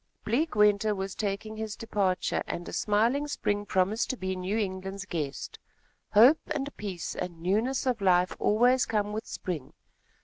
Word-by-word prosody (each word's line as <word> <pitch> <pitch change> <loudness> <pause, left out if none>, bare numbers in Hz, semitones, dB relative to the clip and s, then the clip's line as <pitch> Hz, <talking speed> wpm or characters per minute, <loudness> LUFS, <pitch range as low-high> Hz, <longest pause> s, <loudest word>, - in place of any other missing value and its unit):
Bleak 280 +8 0
winter 210 0 +4
was 190 0 -4
taking 215 +1 -3
his 220 -1 -4
departure 200 -5 0
and 175 - -4
a - - -7
smiling 230 +8 +1
spring 205 -7 -1
promised 190 +5 +1
to 260 - -2
be 190 -2 -2
New 185 +4 -2
England's 195 -1 -3
guest. 150 -6 -4 0.5
Hope 245 +9 +7
and 290 -1 -3
peace 190 -5 -5
and 175 -2 -5
newness 220 +11 0
of 245 -4 0
life 180 -1 +3
always 245 +4 +3
come 210 -1 0
with 220 +2 -4
spring. 160 -8 -5
205 Hz, 160 wpm, -28 LUFS, 185-225 Hz, 0.5 s, Hope